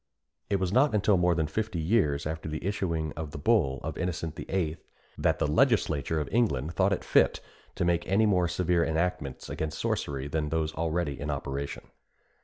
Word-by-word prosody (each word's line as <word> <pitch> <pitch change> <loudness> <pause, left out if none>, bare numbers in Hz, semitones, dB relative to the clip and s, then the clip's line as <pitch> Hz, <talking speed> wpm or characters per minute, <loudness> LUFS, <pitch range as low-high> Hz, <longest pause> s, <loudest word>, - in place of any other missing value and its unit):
It 100 - +2
was 95 -1 0
not 130 0 +4
until 105 0 +3
more 90 -1 +3
than 80 -1 +1
fifty 105 +4 -2
years 80 -5 +1
after 80 0 -4
the 80 +2 -5
issuing 85 -6 -1
of 80 -1 -5
the 75 - -8
bull 75 - +2
of - - -5
Innocent 80 -3 -3
VIII. 85 -3 -2 0.4
that - - +1
the - - +1
legislature 80 - +2
of 75 - -2
England 85 - +1
thought 95 +1 +1
fit - - +3 0.4
to 90 - 0
make 85 0 +1
any 100 +4 +3
more 90 -4 +3
severe 85 0 +1
enactments 80 -5 -2
against 80 -1 -4
sorcery 70 -1 -2
than 75 +1 -1
those 80 0 -1
already 80 -3 -1
in 75 - -4
operation. 70 0 -4
80 Hz, 180 wpm, -28 LUFS, 75-95 Hz, 0.4 s, not